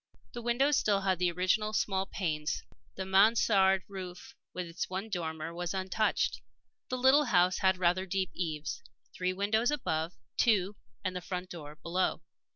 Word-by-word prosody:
The 240 Hz, -, -5 dB
windows 255 Hz, +5 st, +2 dB
had -, -, +4 dB
still 195 Hz, -2 st, +2 dB
the 180 Hz, 0 st, +1 dB
original 185 Hz, +5 st, +1 dB
small 195 Hz, -2 st, 0 dB
panes; 155 Hz, -5 st, -2 dB, 0.3 s
the 190 Hz, -, -4 dB
mansarde 195 Hz, -1 st, +4 dB
roof, 185 Hz, -3 st, -8 dB, 0.2 s
with 180 Hz, -, -4 dB
its 170 Hz, 0 st, -4 dB
one 190 Hz, +4 st, -4 dB
dormer, 160 Hz, -2 st, -3 dB
was 175 Hz, +2 st, -3 dB
untouched. 190 Hz, -, 0 dB, 0.5 s
The 255 Hz, -, -1 dB
little 265 Hz, +4 st, +5 dB
house 180 Hz, -5 st, +3 dB
had 190 Hz, -1 st, +3 dB
rather 180 Hz, +1 st, +1 dB
deep 190 Hz, 0 st, -1 dB
eaves; 155 Hz, -4 st, -3 dB, 0.3 s
three 180 Hz, 0 st, -1 dB
windows 210 Hz, +5 st, +1 dB
above; 165 Hz, -, -1 dB, 0.2 s
two, 205 Hz, -3 st, +3 dB, 0.3 s
and 185 Hz, 0 st, -2 dB
the 180 Hz, -, -3 dB
front 180 Hz, 0 st, -5 dB
door, 150 Hz, -3 st, -8 dB
below. 175 Hz, +4 st, -1 dB
185 Hz, 160 wpm, -31 LUFS, 175-205 Hz, 0.5 s, little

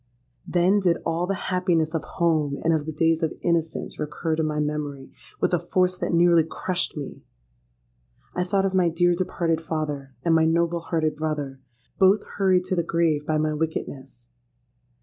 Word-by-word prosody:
Then 180 Hz, +3 st, +3 dB
did 175 Hz, -4 st, +2 dB
all 165 Hz, +2 st, 0 dB
the 195 Hz, -, 0 dB, 0.2 s
happiness 175 Hz, -4 st, +1 dB
of 165 Hz, -, -1 dB
home 155 Hz, -4 st, 0 dB
and 165 Hz, -, +3 dB
of 155 Hz, -1 st, -1 dB
the -, -, -2 dB
days 165 Hz, +1 st, +1 dB
of 160 Hz, -, -1 dB
innocence 165 Hz, -2 st, -1 dB
recur 155 Hz, +2 st, -2 dB
to 160 Hz, -, -1 dB
my 155 Hz, -1 st, -1 dB
memory 150 Hz, -2 st, -3 dB, 0.3 s
with -, -, +1 dB
a 175 Hz, -, +3 dB
force 180 Hz, +1 st, +1 dB
that -, -, -1 dB
nearly 170 Hz, -1 st, +5 dB
crushed 180 Hz, +2 st, -3 dB
me! 145 Hz, -, -7 dB, 1.1 s
I 180 Hz, -, 0 dB
thought 195 Hz, +1 st, +1 dB
of 190 Hz, -, -1 dB
my 180 Hz, -2 st, +3 dB
dear 175 Hz, +2 st, +2 dB
departed 170 Hz, -2 st, -1 dB
father 150 Hz, -4 st, -4 dB
and 165 Hz, -, +4 dB
my 160 Hz, 0 st, +4 dB
noble 170 Hz, +1 st, +1 dB
hearted 160 Hz, -2 st, -1 dB
brother—both 145 Hz, -, -1 dB, 0.2 s
hurried 185 Hz, -2 st, +3 dB
to 185 Hz, -, -2 dB
the 170 Hz, -, +2 dB
grave 165 Hz, -3 st, 0 dB
by 155 Hz, -, +1 dB
my 155 Hz, 0 st, 0 dB
wickedness! 140 Hz, -5 st, -5 dB
165 Hz, 170 wpm, -24 LUFS, 150-175 Hz, 1.1 s, nearly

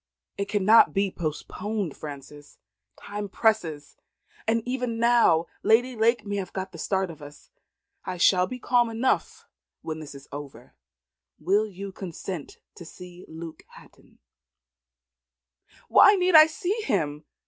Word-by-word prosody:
"It 200 Hz, -, -2 dB
cannot 210 Hz, +2 st, +5 dB
be 195 Hz, -1 st, +1 dB
postponed, 185 Hz, +3 st, -4 dB
Frances. 145 Hz, 0 st, -10 dB, 0.4 s
Time 205 Hz, 0 st, -6 dB
presses, 180 Hz, -10 st, -1 dB, 0.5 s
and 230 Hz, +1 st, 0 dB
even 250 Hz, -2 st, -2 dB
now 230 Hz, -8 st, +4 dB, 0.2 s
Lady 245 Hz, +3 st, +3 dB
Lake 225 Hz, 0 st, +2 dB
may 205 Hz, 0 st, -3 dB
have 190 Hz, -2 st, -5 dB
got 190 Hz, 0 st, -5 dB
the 165 Hz, -, -11 dB
start 190 Hz, -1 st, -1 dB
of 155 Hz, -, -14 dB
us. 145 Hz, -, -13 dB, 0.5 s
I 180 Hz, -, -5 dB
shall 180 Hz, +1 st, +4 dB
be 255 Hz, -, -6 dB
calm 240 Hz, -1 st, +2 dB
enough 230 Hz, +3 st, -1 dB, 0.4 s
when 160 Hz, 0 st, -5 dB
this 150 Hz, -2 st, -10 dB
is 140 Hz, 0 st, -13 dB
over. 140 Hz, -4 st, -10 dB, 0.7 s
Will 205 Hz, +4 st, +1 dB
you 195 Hz, 0 st, -8 dB
consent 185 Hz, -3 st, -7 dB, 0.2 s
to -, -, -9 dB
see 180 Hz, +1 st, -12 dB
Luke 160 Hz, 0 st, -9 dB
Hatton?" -, -, -19 dB, 1.7 s
"Why 410 Hz, -, +7 dB
need 365 Hz, -1 st, +1 dB
I 310 Hz, -1 st, +9 dB
see 405 Hz, +5 st, -3 dB
him?" 150 Hz, -, -2 dB
195 Hz, 135 wpm, -26 LUFS, 160-230 Hz, 1.7 s, I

